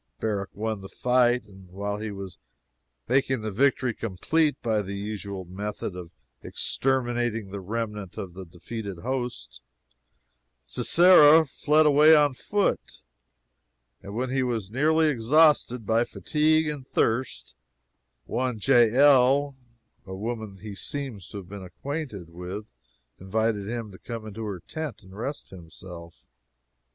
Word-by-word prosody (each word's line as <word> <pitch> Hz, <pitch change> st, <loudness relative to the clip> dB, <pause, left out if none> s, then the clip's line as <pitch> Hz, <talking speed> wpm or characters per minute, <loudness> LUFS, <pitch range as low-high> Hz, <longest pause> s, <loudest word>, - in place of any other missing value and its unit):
Barak 100 Hz, -3 st, -2 dB
won 110 Hz, -1 st, -3 dB
the 95 Hz, -, -10 dB
fight, 125 Hz, -1 st, +2 dB
and 95 Hz, -2 st, -16 dB
while 100 Hz, +2 st, -4 dB
he 110 Hz, 0 st, -4 dB
was 100 Hz, -3 st, -8 dB, 0.7 s
making 130 Hz, -1 st, +1 dB
the 110 Hz, -, -3 dB
victory 130 Hz, +2 st, +2 dB
complete 145 Hz, -, 0 dB
by 110 Hz, -2 st, +1 dB
the 100 Hz, 0 st, -6 dB
usual 100 Hz, -2 st, -5 dB
method 100 Hz, +1 st, -5 dB
of 90 Hz, -2 st, -8 dB, 0.3 s
exterminating 120 Hz, -5 st, -1 dB
the 100 Hz, -, -5 dB
remnant 105 Hz, -1 st, -5 dB
of 90 Hz, -3 st, -6 dB
the 95 Hz, +1 st, -8 dB
defeated 95 Hz, +3 st, -7 dB
host, 115 Hz, -, -4 dB, 1.0 s
Sisera 160 Hz, -, +6 dB
fled 150 Hz, +2 st, +2 dB
away 150 Hz, +2 st, +7 dB
on 145 Hz, -2 st, +4 dB
foot, 205 Hz, +9 st, -2 dB, 1.0 s
and 100 Hz, +1 st, -9 dB
when 125 Hz, +2 st, -2 dB
he 135 Hz, 0 st, +1 dB
was 115 Hz, -6 st, -2 dB
nearly 155 Hz, +5 st, +3 dB
exhausted 135 Hz, -2 st, +3 dB
by 115 Hz, +3 st, +3 dB
fatigue 155 Hz, +4 st, +1 dB
and 145 Hz, -3 st, -5 dB
thirst, 115 Hz, +3 st, -1 dB, 0.7 s
one 125 Hz, 0 st, -2 dB
Jael, 135 Hz, +3 st, +5 dB, 0.5 s
a 95 Hz, -, -6 dB
woman 110 Hz, -1 st, -5 dB
he 105 Hz, +1 st, -8 dB
seems 125 Hz, -2 st, -5 dB
to -, -, -8 dB
have 95 Hz, -3 st, -8 dB
been 100 Hz, +1 st, -8 dB
acquainted 105 Hz, -, -6 dB
with, 90 Hz, +5 st, -7 dB, 0.5 s
invited 105 Hz, +1 st, -1 dB
him 115 Hz, -3 st, -4 dB
to 95 Hz, -, -13 dB
come 115 Hz, -2 st, -7 dB
into 110 Hz, +1 st, -6 dB
her 100 Hz, -4 st, -5 dB
tent 155 Hz, -, -6 dB
and 95 Hz, 0 st, -14 dB
rest 135 Hz, +7 st, -5 dB
himself. 85 Hz, -1 st, -12 dB
110 Hz, 135 wpm, -26 LUFS, 100-135 Hz, 1.0 s, away